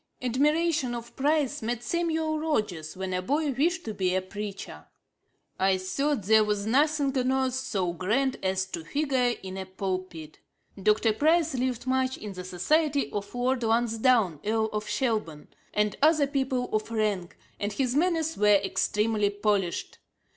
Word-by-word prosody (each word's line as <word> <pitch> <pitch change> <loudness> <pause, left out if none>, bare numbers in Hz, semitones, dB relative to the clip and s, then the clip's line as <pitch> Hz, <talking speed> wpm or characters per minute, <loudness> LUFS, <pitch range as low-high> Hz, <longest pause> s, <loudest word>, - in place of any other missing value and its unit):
Admiration 290 +1 +1
of 235 0 -8
Price 290 0 +1
made 235 +1 -3
Samuel 320 +1 -1
Rogers, 205 - -2
when 190 0 -3
a 180 - 0
boy, 290 +9 0
wish 340 +8 0
to 220 - -4
be 185 -2 0
a 185 - +1
preacher. 200 +1 -7 0.7
'I 190 0 +3
thought 260 +7 -1
there 215 +2 +5
was 210 -1 -1
nothing 285 +3 +2
on 255 0 +1
earth 265 -1 +1
so 195 -9 -1
grand 230 +10 0
as 190 0 0
to 180 -3 -6
figure 255 - 0
in 190 0 -6
a 190 -1 -5
pulpit. 185 -4 -5 0.4
Dr. 215 +2 +3
Price 320 +6 +2
lived 250 -1 -2
much 260 0 0
in 210 -2 -7
the 180 -1 -7
society 285 - +1
of 205 +2 -5
Lord 250 +1 0
Lansdowne 225 - +2
[Earl 220 +1 0
of 210 0 -3
Shelburne] 215 - -2 0.2
and 210 -1 +1
other 305 -1 +5
people 265 -3 -1
of 215 +1 -1
rank; 210 -6 -1 0.2
and 205 +1 -2
his 255 +3 -1
manners 325 0 +1
were 210 - +2
extremely 210 +1 +1
polished. 205 -3 -1
230 Hz, 155 wpm, -27 LUFS, 195-275 Hz, 0.7 s, there